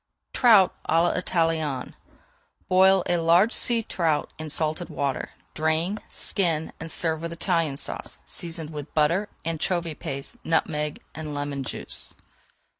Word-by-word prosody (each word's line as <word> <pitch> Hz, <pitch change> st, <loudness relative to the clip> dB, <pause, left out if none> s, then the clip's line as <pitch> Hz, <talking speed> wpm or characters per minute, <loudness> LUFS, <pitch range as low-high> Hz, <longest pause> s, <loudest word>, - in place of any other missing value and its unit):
TROUT 215 Hz, -7 st, +6 dB, 0.2 s
À 165 Hz, +1 st, +4 dB
L'ITALIENNE 165 Hz, -6 st, 0 dB, 0.7 s
Boil 190 Hz, 0 st, +5 dB
a 175 Hz, -, +2 dB
large 170 Hz, +6 st, +5 dB
sea 235 Hz, -2 st, +2 dB
trout 165 Hz, -7 st, 0 dB
in 155 Hz, 0 st, -5 dB
salted 155 Hz, +3 st, -1 dB
water, 140 Hz, -2 st, -2 dB, 0.2 s
drain, 160 Hz, +6 st, 0 dB
skin, 165 Hz, -5 st, -1 dB
and 165 Hz, 0 st, -6 dB
serve 160 Hz, -2 st, 0 dB
with 170 Hz, 0 st, -4 dB
Italian 165 Hz, -4 st, 0 dB
Sauce, -, -, -5 dB
seasoned 165 Hz, -2 st, -4 dB
with 150 Hz, -1 st, -7 dB
butter, 170 Hz, +7 st, +2 dB, 0.2 s
anchovy 165 Hz, +1 st, -1 dB
paste, 140 Hz, -2 st, -6 dB
nutmeg, 150 Hz, -2 st, 0 dB
and 155 Hz, -2 st, -5 dB
lemon 145 Hz, -1 st, -3 dB
juice. -, -, -3 dB
165 Hz, 125 wpm, -26 LUFS, 150-175 Hz, 0.7 s, TROUT